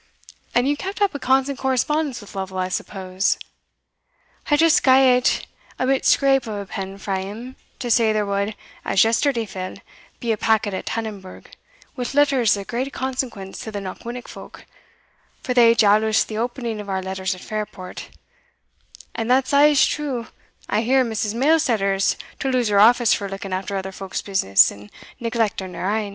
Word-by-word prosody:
And 245 Hz, +2 st, +3 dB
you 290 Hz, -, +2 dB
kept 385 Hz, +8 st, -6 dB
up 405 Hz, -1 st, +2 dB
a 285 Hz, -, -5 dB
constant 265 Hz, +1 st, +1 dB
correspondence 265 Hz, +1 st, 0 dB
with 205 Hz, -, -13 dB
Lovel, 190 Hz, -1 st, -5 dB
I 185 Hz, 0 st, -1 dB
suppose?" 185 Hz, 0 st, -1 dB, 1.1 s
"I 295 Hz, -, +4 dB
just 325 Hz, 0 st, +4 dB
gat 260 Hz, -1 st, +4 dB, 0.3 s
ae 255 Hz, -, +1 dB
bit 270 Hz, 0 st, +1 dB
scrape 270 Hz, -3 st, +3 dB
o' 210 Hz, -2 st, -4 dB
a -, -, -7 dB
pen 195 Hz, 0 st, -6 dB
frae 195 Hz, -1 st, -3 dB
him, 225 Hz, +7 st, -8 dB, 0.2 s
to 245 Hz, -2 st, -3 dB
say 225 Hz, -1 st, +4 dB
there 215 Hz, -1 st, 0 dB
wad, 200 Hz, +1 st, -2 dB, 0.3 s
as 195 Hz, -, +3 dB
yesterday 230 Hz, +1 st, +1 dB
fell, 185 Hz, -2 st, -6 dB, 0.4 s
be 235 Hz, -, -1 dB
a 220 Hz, -, 0 dB
packet 210 Hz, -2 st, +1 dB
at 190 Hz, -, -5 dB
Tannonburgh, 210 Hz, -5 st, -6 dB, 0.4 s
wi' 250 Hz, -, -3 dB
letters 270 Hz, -7 st, +3 dB
o' 200 Hz, -, -5 dB
great 250 Hz, +6 st, -3 dB
consequence 255 Hz, -8 st, -4 dB
to 220 Hz, -, -6 dB
the 205 Hz, -, -5 dB
Knockwinnock 235 Hz, +6 st, -7 dB
folk; -, -, -12 dB, 0.8 s
for 250 Hz, -, -1 dB
they 235 Hz, -2 st, +6 dB
jaloused 215 Hz, 0 st, +3 dB
the 215 Hz, -, -5 dB
opening 235 Hz, -2 st, -3 dB
of 205 Hz, -, -10 dB
our 190 Hz, -1 st, -2 dB
letters 190 Hz, 0 st, -3 dB
at 180 Hz, -, -13 dB
Fairport 210 Hz, -3 st, -6 dB, 1.0 s
And 225 Hz, +1 st, -3 dB
that's 260 Hz, +2 st, +2 dB
a's 290 Hz, 0 st, +6 dB
true; 265 Hz, -6 st, -3 dB, 0.4 s
I 215 Hz, -, +1 dB
hear 260 Hz, +3 st, +3 dB
Mrs. 220 Hz, -1 st, -2 dB
Mailsetter 250 Hz, -8 st, +2 dB
is 195 Hz, 0 st, +1 dB, 0.2 s
to 270 Hz, -, -1 dB
lose 250 Hz, -4 st, +1 dB
her 200 Hz, -1 st, +3 dB
office 235 Hz, +2 st, +6 dB
for 200 Hz, -1 st, -2 dB
looking 195 Hz, 0 st, -6 dB
after 195 Hz, +1 st, -3 dB
other 190 Hz, 0 st, -4 dB
folk's 190 Hz, 0 st, -5 dB
business 190 Hz, -, +4 dB
and 105 Hz, +1 st, -13 dB, 0.3 s
neglecting 225 Hz, -6 st, -2 dB
her 200 Hz, +3 st, -1 dB
ain." 215 Hz, -2 st, -2 dB
225 Hz, 175 wpm, -22 LUFS, 195-260 Hz, 1.1 s, they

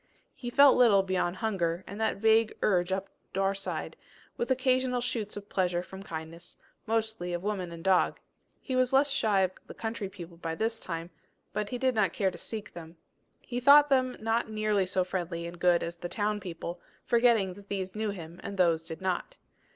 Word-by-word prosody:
He 240 Hz, -, -6 dB
felt 280 Hz, +2 st, +7 dB
little 215 Hz, -6 st, +6 dB
beyond 185 Hz, -2 st, 0 dB
hunger, 185 Hz, -5 st, -1 dB
and 200 Hz, +3 st, -7 dB
that 220 Hz, -, +1 dB
vague 220 Hz, +1 st, +3 dB
urging 190 Hz, -1 st, +2 dB
up 195 Hz, -, -6 dB, 0.3 s
Daurside, 195 Hz, 0 st, -1 dB, 0.4 s
with 240 Hz, -, -2 dB
occasional 255 Hz, -1 st, +2 dB
shoots 230 Hz, -4 st, -3 dB
of 205 Hz, 0 st, -8 dB
pleasure 180 Hz, -3 st, 0 dB
from 190 Hz, +1 st, -10 dB
kindness, 165 Hz, -1 st, -8 dB, 0.3 s
mostly 220 Hz, -5 st, -1 dB
of 175 Hz, +1 st, -3 dB
woman 195 Hz, -4 st, -2 dB
and 165 Hz, -1 st, -9 dB
dog. 190 Hz, -1 st, +3 dB, 0.4 s
He 260 Hz, -, -4 dB
was 255 Hz, 0 st, +2 dB
less 280 Hz, +1 st, +4 dB
shy 215 Hz, -7 st, +2 dB
of 185 Hz, -1 st, +2 dB, 0.2 s
the -, -, -10 dB
country 220 Hz, -3 st, -4 dB
people 175 Hz, -3 st, -10 dB
by 165 Hz, -1 st, -4 dB
this 225 Hz, +4 st, -1 dB
time, 165 Hz, 0 st, -5 dB, 0.4 s
but 210 Hz, 0 st, -2 dB
he 250 Hz, -, -3 dB
did 260 Hz, 0 st, +1 dB
not 200 Hz, -6 st, +2 dB
care 195 Hz, -2 st, +1 dB
to -, -, -10 dB
seek 220 Hz, -1 st, -6 dB
them. 165 Hz, 0 st, -10 dB, 0.4 s
He 245 Hz, -1 st, -4 dB
thought 285 Hz, +3 st, +7 dB
them 255 Hz, -2 st, +2 dB
not 225 Hz, +1 st, 0 dB
nearly 215 Hz, -3 st, +1 dB
so 185 Hz, 0 st, +1 dB
friendly 175 Hz, -2 st, -3 dB
and 170 Hz, 0 st, -8 dB
good 175 Hz, -1 st, +4 dB
as 170 Hz, +1 st, -5 dB
the 175 Hz, +1 st, -6 dB
town 210 Hz, +1 st, -1 dB
people, 175 Hz, -2 st, -6 dB, 0.2 s
forgetting 230 Hz, -5 st, +3 dB
that 200 Hz, +1 st, -15 dB
those 190 Hz, -2 st, -3 dB
knew 215 Hz, 0 st, -2 dB
him 170 Hz, -3 st, -7 dB
and 200 Hz, -, -6 dB
these 165 Hz, -3 st, +3 dB
did 165 Hz, +2 st, -7 dB
not. 190 Hz, -, -2 dB
195 Hz, 195 wpm, -29 LUFS, 175-225 Hz, 0.4 s, felt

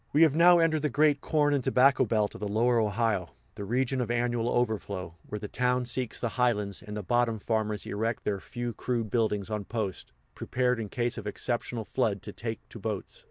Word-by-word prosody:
We 155 Hz, +3 st, +6 dB
have 155 Hz, -4 st, +5 dB
now 175 Hz, +2 st, +7 dB
entered 165 Hz, -2 st, +2 dB
the 150 Hz, -, +1 dB
great 145 Hz, +1 st, +3 dB
corn 150 Hz, -2 st, +2 dB
and 140 Hz, -3 st, +1 dB
tobacco 130 Hz, +2 st, +4 dB
belt 105 Hz, -2 st, +1 dB
of -, -, -9 dB
the 105 Hz, -, -1 dB
Lower 115 Hz, +4 st, +2 dB
Ohio, 105 Hz, -4 st, 0 dB, 0.2 s
the 105 Hz, -, -7 dB
region 125 Hz, +5 st, 0 dB
of 120 Hz, -, -2 dB
annual 120 Hz, 0 st, 0 dB
overflow, 105 Hz, -8 st, -1 dB, 0.2 s
where 105 Hz, -, -3 dB
the 105 Hz, -, -6 dB
towns 125 Hz, +1 st, 0 dB
seek 125 Hz, -1 st, -2 dB
the 120 Hz, -, -1 dB
highlands, 105 Hz, -5 st, +1 dB
and 105 Hz, 0 st, -7 dB
the 105 Hz, -, -4 dB
bottom 120 Hz, +2 st, +1 dB
farmers 110 Hz, -1 st, -1 dB
erect 110 Hz, +2 st, -2 dB
their 100 Hz, -2 st, -1 dB
few 120 Hz, +2 st, -5 dB
crude 115 Hz, -1 st, -2 dB
buildings 110 Hz, -3 st, 0 dB
on 105 Hz, -1 st, -2 dB
posts, 105 Hz, -5 st, -4 dB, 0.2 s
prepared 125 Hz, -1 st, 0 dB
in 110 Hz, -2 st, -4 dB
case 120 Hz, +1 st, -1 dB
of 105 Hz, -, -7 dB
exceptional 120 Hz, +1 st, -3 dB
flood 110 Hz, -7 st, -1 dB
to -, -, -7 dB
take 115 Hz, -1 st, -5 dB
to 115 Hz, -, -10 dB
boats. 105 Hz, -2 st, -4 dB
115 Hz, 205 wpm, -29 LUFS, 105-125 Hz, 0.2 s, now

